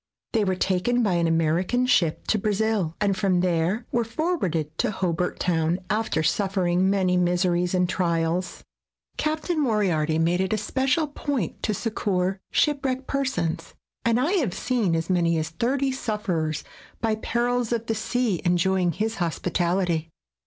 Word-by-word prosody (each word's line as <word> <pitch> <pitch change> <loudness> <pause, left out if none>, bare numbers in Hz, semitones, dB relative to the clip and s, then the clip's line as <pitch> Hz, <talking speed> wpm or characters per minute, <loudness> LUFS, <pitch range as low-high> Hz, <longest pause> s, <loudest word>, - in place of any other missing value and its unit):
They 225 -3 +3
were 190 -2 +1
taken 195 +7 +1
by 200 -4 +2
an 170 -1 +2
American 165 +9 +1
ship 170 -10 +2
to 215 - +1
Brazil, 210 -4 0
and 200 -2 +2
from 185 -3 +1
there 180 +5 0
were 235 - +1
forwarded 220 - -2
to - - +2
Hobart 180 -3 -1
Town, 165 -1 +1
after 210 -7 0
suf 195 +4 0
fering 175 -2 +2
many 190 -2 +2
miseries 180 0 +1
and 180 0 +2
trials. 170 0 -1 0.5
Captain 310 +2 -1
Moriarity 180 - +1
made 170 +3 +2
it 190 +2 0
a - - +1
special 265 +8 +1
point 285 - -3
to 215 - 0
succor 190 -3 -1
shipwrecked 270 -3 +1
persons, 175 -14 -2 0.3
and 230 +1 +2
I 295 +7 +1
have 245 - 0
seen 225 -10 0
as 165 0 -1
many 170 -3 +2
as 155 0 -2
thirty 260 - 0
sufferers 195 - -2 0.4
by 225 -1 +1
perils 240 +2 -1
of 230 -1 -1
the 225 - 0
sea 220 -3 -1
enjoying 180 0 +2
his 220 +4 -2
hospitality. 175 -1 0
190 Hz, 150 wpm, -25 LUFS, 175-230 Hz, 0.5 s, They